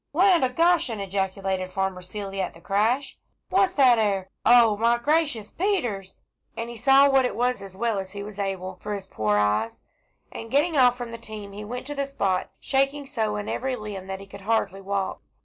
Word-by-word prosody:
"Land 360 -1 +4
o' 260 - +3
Goshen!" 325 -6 +2
ejaculated 190 -1 -2
Farmer 190 -1 -2
Seeley, 195 +1 -5
at 185 - -4
the - - -14
crash. 220 +10 0 0.3
"What's 380 0 +3
that 255 -5 +5
'ere? 195 -3 0
O 235 -2 +6
my 230 +3 +2
gracious 285 -5 0
Peters!" 245 - -2 0.3
as 230 0 -3
he 235 - -8
saw 270 +4 +6
what 270 -1 +4
it 250 - -1
was 245 -2 0
as 195 -1 -10
well 225 -2 0
as 190 0 -7
he 200 0 -5
was 205 -1 -9
able, 190 -2 -3
for 210 0 -3
his 195 -1 -7
poor 105 - 0
eyes. 105 +2 0 0.5
And 225 - -8
getting 300 +6 +2
off 250 -3 +5
from 240 -2 -6
the 230 - -7
team 215 -3 -8
he 205 +1 -8
went 245 +5 -6
to 290 - -5
the 280 -1 -2
spot, 195 -9 -1
shaking 275 +1 0
so 220 -6 -2
in 210 0 -4
every 260 0 -2
limb, 210 -4 -7
that 190 0 -5
he 195 - -10
could 195 0 -12
hardly 195 -2 0
walk. 195 0 -3
215 Hz, 205 wpm, -25 LUFS, 195-260 Hz, 0.5 s, O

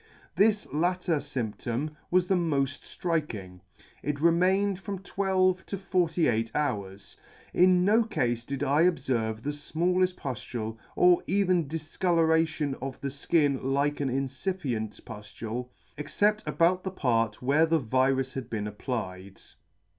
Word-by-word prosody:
This 210 0 +3
latter 175 +1 +1
fymptom 135 +1 -3
was 180 0 +3
the 190 - +2
molt 150 -6 +1
Striking; 140 - -4 0.4
it 145 0 -2
re 170 +3 +5
mained 190 +3 +2
from 195 0 -5
twelve 190 -1 +1
to 200 - -4
forty 180 -4 +1
eight 115 -1 0
hours. 100 -9 -3 0.4
In 180 0 +5
no 215 +4 +5
cafe 120 - 0
did 140 0 -3
I 145 +2 +3
obferve 120 -9 0
the 145 - -1
fmalleft 180 +5 0
puftule, 115 -3 -5 0.2
or 180 -1 +5
even 185 -5 +2
difcolouration 160 -1 +1
of 135 0 -5
the 140 - -3
Ikin 140 0 +1
like 140 +2 0
an 140 -2 0
incipient 130 - -3
puftule, 110 +3 -6 0.3
except 210 +8 +1
about 180 +2 +2
the 190 - -2
part 115 - 0
where 150 +5 +4
the 165 0 +3
virus 130 0 +1
had 135 -2 -5
been 105 -2 -3
applied. 100 -3 -5
145 Hz, 135 wpm, -28 LUFS, 125-180 Hz, 0.4 s, re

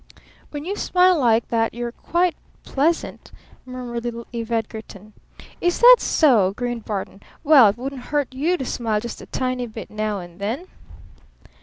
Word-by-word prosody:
"When 295 0 -7
you 395 +3 -3
smile 365 -2 +3
like 230 -3 +2
that 225 -1 0
you're 240 0 -4
quite 345 +6 0 0.3
pleasant," 320 +5 -1 0.4
murmured 245 -2 -6
little 235 -1 -5
Eve 230 -1 -5
Edgarton. 220 -2 -5 0.5
"Is 350 0 +1
that - - +9
so?" 225 - +3
grinned 240 -2 -4
Barton. 200 -1 -5 0.2
"Well, 285 -7 +7
it 205 +2 0
wouldn't 260 0 -6
hurt 290 -3 -1
you 320 +7 0
to 265 - -4
smile 225 -4 -1
just 235 +2 -7
a - - -11
tiny 255 -1 -2
bit 220 -1 -9
now 215 -1 -2
and 175 0 -12
then!" 230 - -3
240 Hz, 160 wpm, -22 LUFS, 220-290 Hz, 0.5 s, that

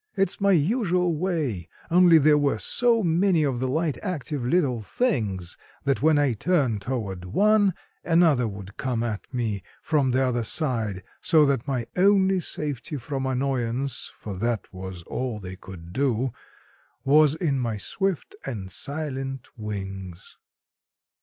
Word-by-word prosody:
"It's 195 -1 +1
my 200 0 +4
usual 180 - +2
way, 150 - -2 0.2
only 175 -1 +7
there 150 0 +5
were 140 -5 +1
so 230 - +2
many 170 0 +3
of 135 -4 0
the 130 - -1
light, 155 +2 -1
active 150 -7 -3
little 130 -4 +1
things 100 - -2 0.3
that 140 -1 0
when 155 0 +4
I 145 -4 +3
turned 125 - +1
toward 100 -6 -4
one 205 - +3 0.3
another 165 -8 +3
would 100 -1 -9
come 120 -3 -1
at 110 +1 -4
me 115 -6 -2 0.2
from 145 -4 +2
the 130 +1 +2
other 125 -2 0
side, 115 - 0 0.2
so 155 -2 +5
that 140 -1 0
my 130 -4 -1
only 190 0 +4
safety 150 -2 -4
from 135 +1 -3
annoyance—for 130 -4 -2
that 115 -1 -2
was 95 -1 -7
all 125 +3 -4
they 95 -1 -7
could 90 -3 -11
do—was 135 +3 0
in 150 -5 0
my 115 -4 -2
swift 190 - -2
and 100 -8 -5
silent 135 -3 -4
wings. 95 -4 -7
135 Hz, 140 wpm, -25 LUFS, 110-160 Hz, 0.3 s, only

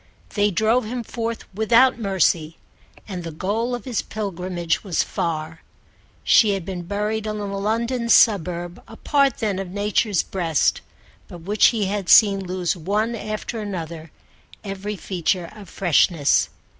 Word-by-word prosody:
They 205 -1 +2
drove 220 +6 +2
him 240 +2 -4
forth 230 0 -4
without 235 +5 +4
mercy, 175 -6 0 0.5
and 185 -4 -6
the 165 - -5
goal 215 +9 -2
of 240 - -9
his 245 -4 -1
pilgrimage 180 -5 -3
was 185 -6 0
far. 160 -1 -4 0.6
She 210 -3 +5
had 190 -4 -5
been 185 -2 -5
buried 210 +2 -2
in 215 0 -3
a 205 - -4
London 235 +3 -1
suburb, 175 -6 +3
a 225 - -12
part 280 -3 +2
then 205 -4 -1
of 195 -2 -5
Nature's 205 0 0
breast, 165 -6 0 0.5
but 175 - -11
which 200 +4 +4
he 220 -4 0
had 195 -1 -3
seen 200 -3 +6
lose 180 -1 -2
one 205 +7 -1
after 215 +1 -5
another 170 -5 -6 0.5
every 200 +1 -5
feature 180 -2 -2
of 205 -4 -12
freshness. 170 -4 +2
200 Hz, 145 wpm, -22 LUFS, 175-220 Hz, 0.6 s, seen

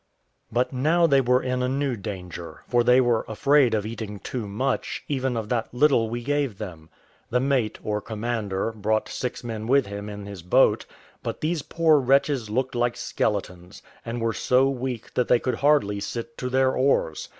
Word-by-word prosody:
But 125 +4 0
now 160 +7 +3
they 140 -4 +4
were 125 0 +2
in 125 0 -1
a 125 - 0
new 135 -1 0
danger; 90 -5 -7
for 120 -1 +3
they 125 +2 +5
were 120 -3 +2
afraid 130 +2 +3
of 105 -1 -1
eating 110 -2 -5
too 110 +3 -5
much, 130 +7 -2
even 130 -3 -1
of 110 -2 -3
that 115 -2 -1
little 125 -5 +3
we 120 +1 -4
gave 140 -5 -1
them. 85 -7 -8 0.4
The 125 - +2
mate, 130 -5 0
or 105 0 -1
commander, 110 -2 -2
brought 110 0 -1
six 125 -1 -4
men 110 -2 -5
with 135 +1 +4
him 100 +1 -6
in 105 -1 -7
his 100 -3 -8
boat; 90 - +3 0.3
but - - -4
these 160 0 0
poor 160 0 +3
wretches 135 -2 +2
looked 130 +4 -1
like 120 0 0
skeletons, 95 -2 -3 0.2
and 115 +1 -4
were 115 0 0
so 130 +4 +3
weak 125 -3 -5
that 125 - +1
they 125 - +5
could 125 -1 -2
hardly 140 -9 +2
sit 115 +8 -5
to 125 - -2
their 130 0 +2
oars. 130 - +1
120 Hz, 185 wpm, -25 LUFS, 105-130 Hz, 0.4 s, they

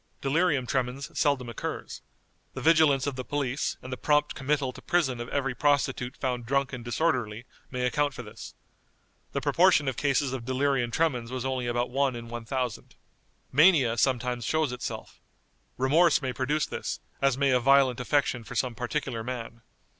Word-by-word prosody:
Delirium 140 -1 +1
tremens 130 +2 -2
seldom 140 -5 +1
occurs. 120 - -5 0.5
The - - -5
vigilance 155 -4 +4
of 145 -2 -2
the 130 - -3
police, 140 -1 -2
and 130 0 -6
the - - -4
prompt 150 0 +2
committal 135 -1 -1
to - - -12
prison 135 -9 +1
of 120 - -6
every 135 -2 -1
prostitute 135 -2 0
found 125 -3 -3
drunk 140 +1 0
and 125 -2 -6
disorderly, 120 -3 -1 0.2
may 125 -1 -2
account 145 +2 0
for 125 - -6
this. 110 +1 -10 0.8
The - - -1
proportion 175 -5 +4
of 130 - -1
cases 140 -2 +1
of 130 -3 -4
delirium 130 -1 0
tremens 125 -4 0
was 130 0 -3
only 130 -2 -1
about 120 +1 -1
one 135 -1 +1
in 115 0 -8
one 120 -1 -6
thousand. 125 -2 -3 0.6
Mania 145 -6 +5
sometimes 125 0 0
shows 155 +3 0
itself. 125 - -6 0.6
Remorse 145 +4 +4
may 130 -3 -3
produce 145 +4 0
this, - - -4 0.2
as 135 -2 +2
may 140 -1 +2
a 125 - +4
violent 135 0 +4
affection 130 -2 0
for 120 +3 -9
some 125 +1 0
particular 125 -1 -3
man. 115 -1 -6
130 Hz, 170 wpm, -27 LUFS, 125-145 Hz, 0.8 s, Mania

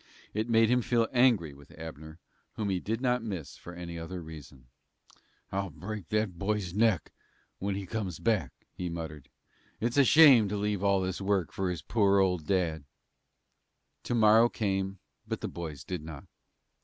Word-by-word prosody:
It 110 +3 -2
made 115 0 +4
him 125 0 +3
feel 115 -1 +1
angry 120 - +3
with 70 0 -16
Abner, 80 -1 -9 0.4
whom 105 -2 -2
he 95 - 0
did 110 +5 -3
not 125 -2 +1
miss 95 -9 -6
for 85 - -11
any 85 -1 -6
other 90 +2 -6
reason. 75 -5 -11 0.9
"I'll 100 0 -2
break 95 +3 -7
that 105 -5 -1
boy's 100 -2 -1
neck 110 -3 +2 0.5
when 100 0 -2
he 100 0 -4
comes 95 -5 -4
back," 105 - 0 0.2
he 90 -1 -4
muttered. 80 -4 -7 0.5
"It's 120 +4 -1
a 140 - +7
shame 135 -7 +7
to 105 - -2
leave 105 -1 -1
all 100 -1 +3
this 95 +1 -3
work 95 -3 0
for 95 -1 -1
his 90 -2 -4
poor, 100 -3 +3
old 90 -5 +1
dad." 85 -6 0 1.2
To 120 - -1
morrow 110 +1 +6
came, 95 -3 -2 0.3
but - - -3
the - - -2
boys 80 -5 -7
did 90 -3 -4
not. 80 -3 -9
95 Hz, 170 wpm, -29 LUFS, 85-110 Hz, 1.2 s, a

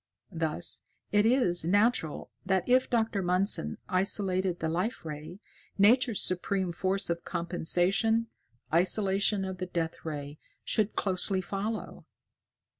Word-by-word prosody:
Thus, 165 +1 -2 0.3
it 205 +1 +4
is 230 -10 +3
natural 205 -2 +1
that 190 0 0
if 255 +1 +3
Dr. 225 -4 0
Mundson 180 - +2
isolated 185 -1 +1
the 160 - -2
Life 180 +6 -2
Ray, 155 +4 -7 0.4
Nature's 230 +2 +4
supreme 185 0 -1
force 190 +2 -1
of 170 0 -3
compensation, 180 +6 0 0.5
isolation 195 +3 +2
of 190 -1 -6
the 185 - -3
Death 165 -2 -3
Ray 145 -2 -6 0.2
should 215 -1 0
closely 190 0 +1
follow. 200 +4 -5
185 Hz, 115 wpm, -29 LUFS, 170-205 Hz, 0.5 s, it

